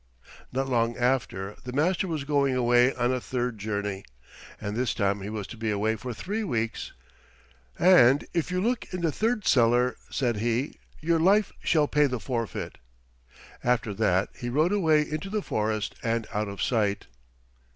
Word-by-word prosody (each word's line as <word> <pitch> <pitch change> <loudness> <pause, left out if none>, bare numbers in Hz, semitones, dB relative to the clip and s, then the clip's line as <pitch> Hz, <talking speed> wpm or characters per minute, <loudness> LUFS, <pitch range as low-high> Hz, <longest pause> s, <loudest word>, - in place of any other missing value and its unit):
Not 135 +2 -1
long 120 -2 +1
after 120 -6 -1
the 125 - -6
Master 175 +7 +1
was 155 -4 -2
going 140 -2 +1
away 120 +1 +4
on 125 0 +1
a 130 - -2
third 125 -3 -3
journey, 100 -2 -3 0.6
and 105 +1 -4
this 125 0 0
time 100 0 0
he 100 - -5
was 105 -2 -4
to 115 - -10
be 110 0 -2
away 105 +2 +1
for 125 +2 -6
three 205 - -3
weeks. 115 - -2 0.8
"And 145 -7 +6
if 170 -1 0
you 180 0 -1
look 240 +4 -1
in 180 - -4
the 165 -2 +1
third 220 +5 -1
cellar," 120 0 +3
said 120 -5 0
he, 120 +5 -1 0.2
"your 165 +1 +2
life 200 +5 +4
shall 150 -3 +3
pay 150 0 +3
the 125 -3 -3
forfeit." 115 -2 -4 0.8
After 120 -3 +1
that 95 -2 +1
he 120 - -5
rode 155 +8 +2
away 160 -7 +3
into 155 +6 -4
the 210 0 -2
forest 110 0 -1
and 115 -1 -1
out 105 0 -1
of 100 -1 -4
sight. 105 -4 0
125 Hz, 170 wpm, -27 LUFS, 110-155 Hz, 0.8 s, And